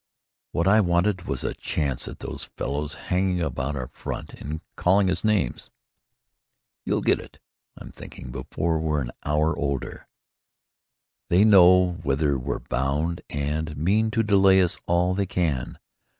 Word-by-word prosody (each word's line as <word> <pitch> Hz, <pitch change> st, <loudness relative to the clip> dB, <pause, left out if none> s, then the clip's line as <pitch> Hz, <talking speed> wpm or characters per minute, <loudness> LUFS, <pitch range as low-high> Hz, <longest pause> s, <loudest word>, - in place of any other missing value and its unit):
"What 85 Hz, +2 st, 0 dB
I 110 Hz, +3 st, +6 dB
wanted 90 Hz, +1 st, +1 dB
was 70 Hz, -2 st, -2 dB
a -, -, -2 dB
chance 70 Hz, -5 st, -2 dB
at -, -, -9 dB
those -, -, -5 dB
fellows 75 Hz, +2 st, -2 dB
hanging 90 Hz, 0 st, -1 dB
about 75 Hz, -3 st, -2 dB
our 65 Hz, -2 st, -5 dB
front -, -, -7 dB
and 75 Hz, +3 st, -6 dB
calling 95 Hz, +1 st, +3 dB
us 90 Hz, -, -2 dB
names." 105 Hz, -, 0 dB, 1.1 s
"You'll -, -, -1 dB
get -, -, +3 dB
it, -, -, -13 dB, 0.4 s
I'm -, -, -10 dB
thinking, 60 Hz, -, -10 dB
before 80 Hz, +5 st, -2 dB
we're 75 Hz, -2 st, 0 dB
an -, -, -4 dB
hour 75 Hz, +2 st, +1 dB
older. 70 Hz, -3 st, -4 dB, 1.2 s
They 90 Hz, +4 st, +5 dB
know 90 Hz, -3 st, +6 dB
whither 70 Hz, +1 st, +1 dB
we're 60 Hz, -, -3 dB
bound 75 Hz, +7 st, -2 dB
and 75 Hz, +1 st, -3 dB
mean 105 Hz, +8 st, +2 dB
to 115 Hz, +1 st, +1 dB
delay 95 Hz, -2 st, +5 dB
us 90 Hz, -, 0 dB
all 90 Hz, +1 st, +2 dB
they 100 Hz, 0 st, -1 dB
can. 80 Hz, -9 st, -1 dB
85 Hz, 150 wpm, -25 LUFS, 70-95 Hz, 1.2 s, I